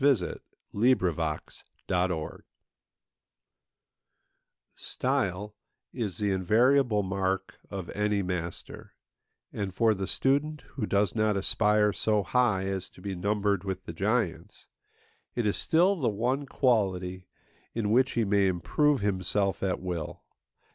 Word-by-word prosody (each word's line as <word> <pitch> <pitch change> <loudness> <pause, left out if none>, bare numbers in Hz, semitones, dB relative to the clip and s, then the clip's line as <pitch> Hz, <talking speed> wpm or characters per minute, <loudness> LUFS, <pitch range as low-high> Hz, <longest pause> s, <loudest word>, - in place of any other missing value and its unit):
93A 135 -10 +2 0.3
NOTE 90 -9 0 0.3
ON 90 +1 +2
REALISM 80 -3 -4 2.3
Style 105 +2 -2 0.4
is 110 -7 -3
the 105 -2 0
invariable 110 +4 +3
mark 95 0 -2
of 95 -3 -6
any 105 -1 0
master; 90 -2 -5 0.6
and 100 -2 -3
for 110 +1 +4
the 95 -2 -4
student 145 +3 0
who 110 -7 -3
does 100 -1 +1
not 110 -2 +1
aspire 105 +1 +2
so 105 0 +1
high 115 -7 +2
as 95 -1 -3
to - - -18
be 100 -1 -4
numbered 100 +1 0
with 95 -1 -4
the 85 - -6
giants, 100 -1 -1 0.7
it 120 - 0
is 105 - +2
still 180 +5 +3
the 140 -11 0
one 125 +7 -1
quality 95 -9 0 0.5
in 110 -3 0
which 130 +3 +3
he 115 -2 +1
may 100 -1 +3
improve 95 - +1
himself 100 0 0
at 95 -2 0
will. 90 -4 -5
100 Hz, 125 wpm, -28 LUFS, 95-115 Hz, 2.3 s, for